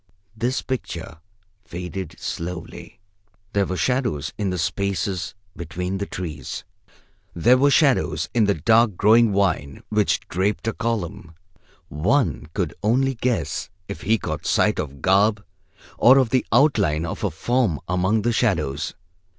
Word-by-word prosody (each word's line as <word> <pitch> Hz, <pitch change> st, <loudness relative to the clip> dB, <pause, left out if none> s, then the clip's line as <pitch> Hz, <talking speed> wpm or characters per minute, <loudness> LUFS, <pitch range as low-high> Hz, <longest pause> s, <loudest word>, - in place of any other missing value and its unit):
This 120 Hz, +4 st, -1 dB
picture 85 Hz, -10 st, -5 dB, 0.4 s
faded 90 Hz, +1 st, -6 dB
slowly. 85 Hz, 0 st, -6 dB, 0.5 s
There 100 Hz, -2 st, +2 dB
were 95 Hz, -, -3 dB
shadows 125 Hz, -, -1 dB
in 100 Hz, -2 st, -2 dB
the 90 Hz, -, -2 dB
spaces 95 Hz, +2 st, -2 dB, 0.2 s
between 90 Hz, +3 st, -4 dB
the 100 Hz, -, -3 dB
trees. 80 Hz, -7 st, -6 dB, 0.7 s
There 120 Hz, +9 st, +4 dB
were 140 Hz, +2 st, +5 dB
shadows 140 Hz, -2 st, +2 dB
in 115 Hz, -3 st, +3 dB
the 100 Hz, -, +2 dB
dark 110 Hz, +5 st, +3 dB
growing 110 Hz, +2 st, +5 dB
vine 90 Hz, -8 st, 0 dB
which 105 Hz, -1 st, +1 dB
draped 100 Hz, +5 st, -1 dB
a 115 Hz, -, 0 dB
column. 105 Hz, -7 st, -3 dB, 0.5 s
One 85 Hz, -, 0 dB
could -, -, -1 dB
only 130 Hz, +5 st, +2 dB
guess 120 Hz, -5 st, -2 dB, 0.2 s
if 100 Hz, -, -7 dB
he 110 Hz, +1 st, +2 dB
caught -, -, -5 dB
sight -, -, +2 dB
of 70 Hz, -1 st, -5 dB
garb 100 Hz, +2 st, +3 dB, 0.5 s
or 130 Hz, +3 st, +7 dB
of 130 Hz, -4 st, +2 dB
the 130 Hz, -, +1 dB
outline 110 Hz, -, +3 dB
of 80 Hz, -, -5 dB
a -, -, +2 dB
form 120 Hz, -, 0 dB
among 95 Hz, +4 st, +1 dB
the 120 Hz, +1 st, +1 dB
shadows. 80 Hz, -, 0 dB
100 Hz, 140 wpm, -23 LUFS, 85-115 Hz, 0.7 s, or